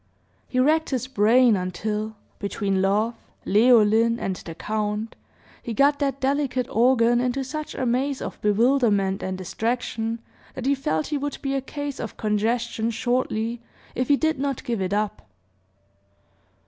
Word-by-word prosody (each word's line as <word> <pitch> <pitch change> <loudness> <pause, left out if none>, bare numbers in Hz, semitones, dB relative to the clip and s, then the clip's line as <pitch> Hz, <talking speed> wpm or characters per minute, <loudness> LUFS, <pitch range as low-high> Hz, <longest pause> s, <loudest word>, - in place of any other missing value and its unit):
He 255 - -1
racked 310 +4 +3
his 255 -3 -1
brain 245 -1 +4
until, 210 +4 -3 0.2
between 200 -1 -1
love, 210 +4 +2 0.3
Leoline, 225 +1 +4
and 190 - -2
the 165 - -9
count, 215 +2 -3 0.5
he 230 - -5
got 285 +4 +4
that 275 -2 -1
delicate 265 -2 0
organ 240 0 +4
into 250 +2 -1
such 305 +3 -5
a 260 - -2
maze 260 +3 0
of - - -6
bewilderment 210 -3 +2
and 185 0 -3
distraction, 225 +3 -2 0.4
that 255 - -5
he 275 - +3
felt 160 - -1
he 290 - 0
would 285 +1 -3
be 275 -1 -1
a 270 - 0
case 285 +1 -5
of 225 - -6
congestion, 225 +2 0
shortly, 235 -1 -1 0.3
if 255 - -1
he 285 - +4
did 315 -2 0
not 275 -2 -2
give 235 -6 -2
it 185 0 -1
up. 210 0 -1
235 Hz, 150 wpm, -24 LUFS, 210-265 Hz, 0.5 s, brain